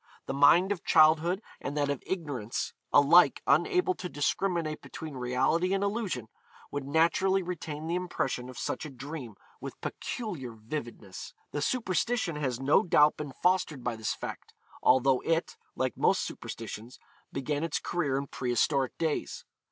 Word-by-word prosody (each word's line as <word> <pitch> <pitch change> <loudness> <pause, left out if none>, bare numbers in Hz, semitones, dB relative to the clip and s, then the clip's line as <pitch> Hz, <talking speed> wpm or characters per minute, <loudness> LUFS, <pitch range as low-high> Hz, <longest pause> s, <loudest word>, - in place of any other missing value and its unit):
The - - -3
mind 165 +8 +5
of 190 -4 -2
childhood 165 +4 +4 0.2
and 145 +2 -4
that 145 -1 +1
of 140 - -3
ignorance, 145 - -3 0.2
alike 145 +5 +6
unable 370 -2 +3
to 180 - -6
discriminate 160 +2 -1
between 160 -2 -8
reality 130 +9 +1
and 195 - 0
illusion, 200 - -2 0.4
would 145 -1 -4
naturally 170 +5 +3
retain 160 -4 -5
the 165 - -2
impression 135 -8 -2
of 130 - -10
such - - -3
a 155 - -6
dream 135 -3 -7 0.2
with - - -8
peculiar 165 - -5
vividness. 110 -4 -7 0.2
The 145 - -2
superstition 225 - 0
has 130 -5 -2
no 135 +7 +4
doubt 150 -6 +4
been 145 -3 -6
fostered 180 -7 +2
by 120 -1 -1
this 110 -1 -2
fact, - - -8 0.3
although 130 0 +4
it, 165 0 -1 0.2
like 130 -3 -1
most - - +3
superstitions, 115 +2 -7 0.3
began 145 +2 -2
its 165 -3 -1
career 145 -6 -1
in 140 - -2
pre 125 -2 -4
historic 135 +2 +1
days. 160 -3 -2
150 Hz, 150 wpm, -29 LUFS, 130-175 Hz, 0.4 s, alike